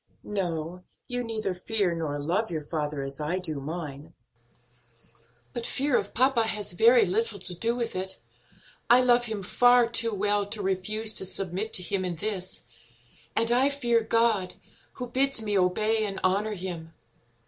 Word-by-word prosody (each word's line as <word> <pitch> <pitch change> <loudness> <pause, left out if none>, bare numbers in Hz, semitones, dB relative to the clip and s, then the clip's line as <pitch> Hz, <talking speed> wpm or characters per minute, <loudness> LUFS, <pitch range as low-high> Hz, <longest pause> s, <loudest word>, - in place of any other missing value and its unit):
"No, 180 -3 -3 0.2
you 245 -1 -3
neither 220 -4 -2
fear 185 0 -1
nor 155 -3 -3
love 175 +10 -1
your 160 -3 -3
father 150 -2 -3
as 135 +1 -7
I 155 +4 -1
do 160 -6 -4
mine; 150 -1 -7 1.4
but 235 - -2
fear 275 -1 0
of - - -1
papa 245 -2 +3
has 210 -4 -2
very 235 +7 +6
little 215 +3 0
to 180 -1 -2
do 230 +7 -1
with 235 -4 -3
it. 190 +1 -4 0.7
I 245 +2 +8
love 245 -1 +4
him 215 -4 -4
far 245 +4 +5
too 230 0 +2
well 205 0 +1
to 205 0 -3
refuse 215 +4 -1
to - - -2
submit 195 +3 -2
to 180 - +2
him 185 +2 -1
in 180 -2 -2
this, 190 +1 -3 0.7
and 230 +1 +2
I 255 +3 +4
fear 240 -5 +1
God, 220 -4 +1 0.4
who 250 - -6
bids 275 0 +2
me 210 -2 -2
obey 215 +4 +3
and 200 -2 -3
honor 205 +3 +1
him. 170 -4 -6
205 Hz, 165 wpm, -27 LUFS, 180-230 Hz, 1.4 s, I